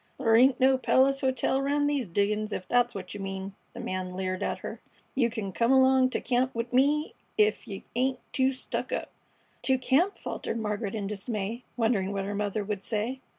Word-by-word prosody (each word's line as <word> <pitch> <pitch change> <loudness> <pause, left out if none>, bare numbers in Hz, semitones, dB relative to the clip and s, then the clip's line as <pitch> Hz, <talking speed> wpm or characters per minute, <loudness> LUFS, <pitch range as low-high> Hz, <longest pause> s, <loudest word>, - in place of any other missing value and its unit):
"Thur 225 0 +3
ain't 255 +3 +5
no 260 0 +4
palace 275 +1 +3
hotel 265 0 +1
round 290 +1 +1
these 285 -6 0
diggin's, 210 +4 0
ef 185 - -4
that's 245 -1 +2
what 185 -2 -6
you 205 - -6
mean," 195 0 -5 0.2
the - - -8
man 185 0 -3
leered 185 0 -2
at - - -1
her. - - -6 0.3
"You 245 -3 +2
c'n 215 -4 -4
come 230 +5 +2
along 260 -1 +5
t' - - -1
camp 255 +1 +1
'ith 235 +2 -3
me 290 +4 +3 0.2
ef 215 +2 +2
you 195 -3 -7
ain't 260 +1 +1 0.2
too 260 0 +3
stuck 260 - -4
up." - - -3 0.5
"To 265 -1 +3
camp!" 285 +10 +2
faltered 230 - -4
Margaret 210 -1 -2
in 205 -2 -3
dismay, 210 +3 -4
wondering 220 -4 +1
what 195 -1 -2
her 205 - -3
mother 205 0 -1
would 200 -1 -4
say. 230 +4 -2
230 Hz, 195 wpm, -28 LUFS, 200-260 Hz, 0.5 s, ain't